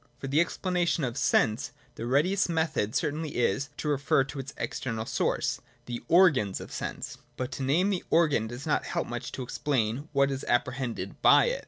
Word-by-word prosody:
For 135 - -7
the 145 +4 +3
explanation 175 -2 0
of 120 -3 -2
Sense, 110 +4 +1 0.2
the 115 - -5
readiest 175 +10 +2
method 160 -9 0
cer 150 -4 +1
tainly 155 0 -4
is, 125 +4 0
to - - -4
refer 140 -2 +2
to 135 +1 -7
its 135 +1 -6
external 115 -3 -3
source - - 0
— - - -35
the 120 -1 -5
organs 155 - +4
of - - -9
sense. - - -5 0.2
But 125 -1 -3
to - - -5
name 170 +10 +2
the 185 - -1
organ 155 -9 +3
does 120 +4 -7
not 155 - +1
help - - -2
much 120 0 -5
to 130 - -4
explain 125 +1 -1
what 140 -1 +3
is 135 0 -4
apprehended 125 0 -1
by - - +7
it. - - -2
140 Hz, 195 wpm, -28 LUFS, 120-160 Hz, 0.2 s, by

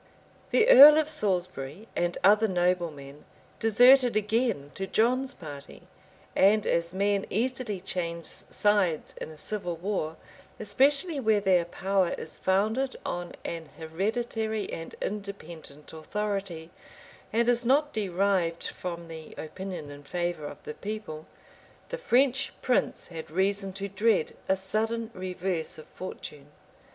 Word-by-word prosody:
The 455 - +4
earl 300 - +11
of 310 -1 +2
Salisbury 185 - -1
and 175 0 0
other 210 +3 +6
noblemen 170 -6 -1 0.4
deserted 245 +2 +6
again 215 - 0
to 195 - -4
John's 255 +6 +1
party; 145 -4 -10 0.5
and 210 +2 +4
as 170 0 0
men 200 +1 0
easily 235 -2 -2
change 170 -3 -3
sides 200 -6 0
in - - -5
a 155 - -11
civil 180 0 -3
war, 165 -3 -3 0.4
especially 280 - +2
where 220 -4 +3
their 185 -4 +3
power 190 +1 0
is - - -8
founded 220 +8 +1
on 175 0 -4
an 165 -2 -5
hereditary 220 +6 -2
and 165 - -7
independent 170 -8 -7
authority, 190 -1 -4 0.6
and 235 +1 +2
is 245 0 +3
not 290 +5 +2
derived 190 -4 0
from 170 -2 -6
the 160 -1 -10
opinion 180 -2 -6
and 145 0 -12
favor 175 -4 -2
of - - -9
the 150 - -6
people, 200 -7 -6 0.6
the - - -4
French 270 - +2
prince 250 - 0
had 165 -2 -8
reason 195 +3 0
to 195 +1 -4
dread 200 -2 +1
a 190 - +4
sudden 220 +4 -2
reverse 185 -3 -3
of 155 - -11
fortune. 150 -6 -8
195 Hz, 130 wpm, -28 LUFS, 170-220 Hz, 0.6 s, earl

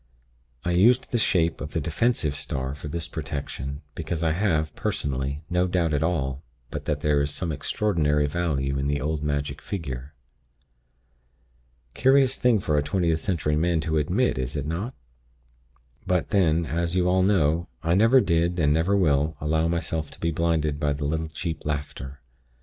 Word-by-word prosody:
I 90 - +1
used 115 +9 +4
the 120 - +1
shape 85 -5 +1
of 75 - -6
the - - +1
defensive 85 - 0
star 65 -2 -3
for 75 +1 -8
this 85 +1 -4
protection, 70 -2 -5
because 85 0 -3
I 80 - +2
have, 80 -4 0
personally, 70 +2 -2
no 90 +1 +1
doubt 85 -3 +1
at 75 - +1
all 70 -5 -1 0.3
but - - -5
that 75 -1 -1
there 75 -1 +2
is 70 - 0
some 80 +3 -2
extraordinary 75 -1 +1
virtue 70 -4 -1
in 70 - -1
the 70 0 0
old 75 +1 -2
magic 70 -1 -2
figure. 70 -6 -5 1.8
Curious 135 0 +4
thing 120 -3 +3
for 75 -5 +1
a - - +1
Twentieth 80 0 0
Century 75 -5 0
man 85 +1 +2
to 80 0 0
admit, 75 -3 +1
is 65 +2 -3
it 75 -2 -2
not? 95 - -3 1.1
But, 90 0 0
then, 85 -5 +3
as 85 +2 -1
you 90 -1 +2
all 95 +1 +3
know, 85 -4 +2 0.2
I 85 +1 +2
never 115 +7 +6
did, 85 -1 +1
and 75 -2 +3
never 85 +6 +2
will, 75 -3 +2
allow 80 +2 +1
myself 80 -2 -2
to - - -13
be 85 - 0
blinded 80 -2 0
by 75 -1 +1
the 70 +1 -4
little 80 +2 -1
cheap 80 -1 -4
laughter. 70 -2 -5
80 Hz, 170 wpm, -25 LUFS, 75-85 Hz, 1.8 s, never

